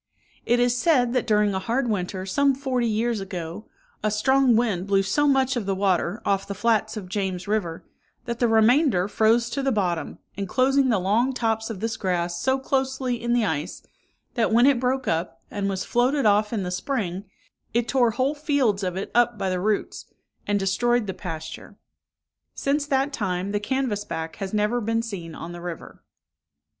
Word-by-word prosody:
It 240 +1 +3
is 245 0 +3
said, 250 -3 +2
that 250 - 0
during 210 -1 +3
a 190 - -1
hard 240 +6 -1
winter, 185 -3 -2
some 275 +8 +2
forty 255 -3 -1
years 225 +1 0
ago, 185 0 -6 0.3
a 215 - +1
strong 255 +4 +3
wind 210 -6 0
blew 195 -1 +3
so 290 +10 +1
much 270 -1 +2
of 225 -5 -3
the 195 - 0
water 190 +1 0
off 195 -1 0
the 200 - -4
flats 220 +1 +1
of 195 -3 -6
James 185 -1 -3
river, 195 -6 -2 0.4
that 235 -1 -4
the 240 - +3
remainder 225 - +4
froze 225 +3 +2
to 275 - -2
the 270 0 +1
bottom, 180 - -1 0.2
enclosing 260 +7 +2
the 225 - +3
long 215 +8 +1
tops 225 -2 -1
of 215 -5 -6
this 225 0 -2
grass 175 -3 -1
so 265 +1 +2
closely 265 -2 -1
in 235 0 0
the 240 -2 +2
ice, 160 -1 -3 0.5
that 230 -3 +1
when 235 +3 +5
it 275 -3 +4
broke 260 +1 -1
up, 165 +2 -1
and 200 -1 -2
was 190 -1 -3
floated 255 +3 +1
off 210 0 +3
in 215 -4 -1
the 180 - -3
spring, 195 -2 -3 0.5
it 235 +1 0
tore 250 -3 +3
whole 255 +5 0
fields 285 -9 +1
of 185 -1 -2
it 195 - -4
up 240 -1 +3
by 195 -2 -1
the 180 - -1
roots, 210 +2 -1 0.4
and 205 0 +2
destroyed 235 +5 +1
the 190 - -4
pasture. 165 -4 -7 0.8
Since 285 +1 0
that 275 0 +1
time, 190 -4 -2
the 205 - 0
canvass 235 -2 -1
back 160 -4 -5
has 195 -2 -4
never 215 +3 +1
been 225 +1 0
seen 175 -8 -6
on 170 - -7
the 175 0 -8
river. 175 -2 -8
220 Hz, 190 wpm, -24 LUFS, 190-245 Hz, 0.8 s, when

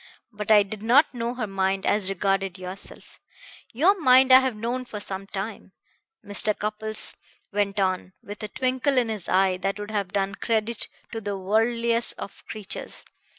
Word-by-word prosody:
But 210 -1 -6
I 210 -2 +7
did 200 +1 -7
not 260 +7 +4
know 240 0 -3
her 245 -3 -2
mind 195 -1 -1
as 205 -2 +2
regarded 195 0 0
yourself. 185 +1 -8 0.5
Your 325 - +4
mind 260 -1 +6
I 260 - +11
have 260 -3 -1
known 240 +4 -2
for 220 -4 -7
some 195 -1 -5
time," 195 -1 -6 0.5
Mr. 205 +1 +1
Cupples 215 +1 -2 0.4
went 205 0 0
on, 185 -1 0
with 205 +2 -8
a 215 - -3
twinkle 260 +4 0
in 240 -2 +3
his 210 -6 -4
eye 185 0 +3
that 195 +2 -2
would 205 +1 -6
have 200 -4 -2
done 200 -1 0
credit 225 +1 -1 0.2
to 225 - -4
the 205 -1 -3
worldliest 230 +4 +2
of 200 - -9
creatures. 215 -3 -3
210 Hz, 170 wpm, -25 LUFS, 195-235 Hz, 0.5 s, I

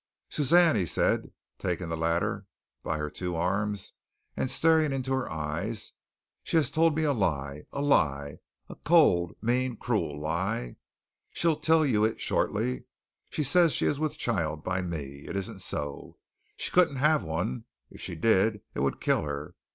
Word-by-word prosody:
"Suzanne," 165 +3 +4
he 95 -5 +1
said, - - +1 0.3
taking 90 -2 -2
the 80 - -1
latter 85 +1 -1 0.3
by - - -2
her 75 0 -2
two 90 -2 -4
arms 100 +4 -1 0.4
and 130 - -1
staring 160 -1 +3
into 135 -1 -1
her 130 -1 -1
eyes, 85 +8 -4 0.5
"she - - 0
has 150 -6 +2
told 165 -1 +3
me 160 - +1
a 145 -2 +2
lie, 75 - -2
a 140 - -3
lie, 70 - +1 0.3
a - - -8
cold, 90 - +4
mean, 125 +1 0
cruel 75 -6 -1
lie. 80 - -2 0.5
She'll 165 -2 +1
tell 160 +1 +3
it 145 - +1
you 110 0 +2
shortly. 65 -1 -1 0.4
She 150 - -2
says 165 +3 +4
she - - 0
is 145 - +1
with 155 -1 -2
child 80 -9 -1
by 95 +1 -1
me. 70 -6 -6
It - - -5
isn't 100 -1 -4
so. 75 -1 -5 0.4
She - - -3
couldn't 180 -6 +4
have 150 +3 +3
one. 80 -4 -3 0.3
If - - -12
she - - -5
did, 105 +3 +2
it - - -4
would - - 0
kill - - +2
her. 75 +3 -5
100 Hz, 165 wpm, -28 LUFS, -, 0.5 s, Suzanne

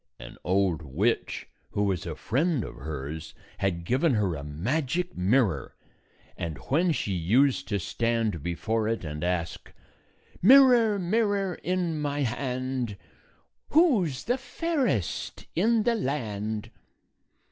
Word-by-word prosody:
An - - -11
old 95 -3 +1
witch, 85 - -1 0.3
who 105 - +1
was 95 -4 -1
a - - -4
friend 145 - 0
of - - -7
hers, 75 +2 -6 0.2
had 85 -3 -1
given 130 - +2
her 100 -5 +1
a 70 -3 -5
magic 130 - -2
mirror; 95 - +1 0.6
and 80 -4 -4
when 170 +6 +3
she 105 -10 -1
used 125 +11 +2
to 105 - 0
stand 115 -1 -1
before 105 +7 -1
it 115 -2 -1
and 75 +1 -5
ask, 85 -1 -2 0.7
"Mirror, 240 -2 +7
mirror, 200 0 +1
in 175 -3 -2
my 145 0 -1
hand, 125 -2 -2 0.7
Who 285 - +4
's 135 -2 -6
the 245 +3 0
fairest 265 - -2
in 220 +5 +3
the 240 +1 +2
land?" 110 - -3
120 Hz, 125 wpm, -27 LUFS, -, 0.7 s, Mirror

